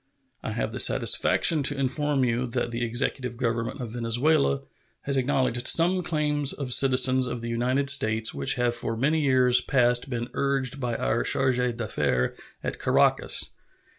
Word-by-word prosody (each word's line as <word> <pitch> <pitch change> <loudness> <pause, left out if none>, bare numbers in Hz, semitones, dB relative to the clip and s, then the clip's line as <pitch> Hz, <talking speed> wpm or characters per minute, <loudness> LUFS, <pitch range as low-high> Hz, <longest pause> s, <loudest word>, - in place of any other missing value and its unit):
I 110 - -5
have 115 - -3
the - - -6
satisfaction 160 -3 +3
to 140 +1 +1
inform 140 +1 0
you 125 +1 -1
that 120 0 -3
the 120 +1 -3
executive 120 +1 -3
government 115 +2 -3
of 120 -3 -6
Venezuela 135 +5 0 0.4
has 140 - -2
acknowledged 130 -2 0
some 180 +2 +4
claims 150 -4 0
of 130 -4 -1
citizens 130 -1 +4
of 120 -1 -5
the 115 - -6
United 125 +4 -1
States 110 -3 +1
which 70 -1 0
have 120 -1 0
for 115 -1 -3
many 150 +6 0
years 130 -3 +3
past 125 -1 +1
been 120 -1 -4
urged 135 -1 -2
by 120 -2 -2
our - - -1
charge 130 -2 +1 0.2
d'affaires 65 - -1 0.3
at - - -5
Caracas. - - +1
125 Hz, 160 wpm, -25 LUFS, 120-140 Hz, 0.4 s, some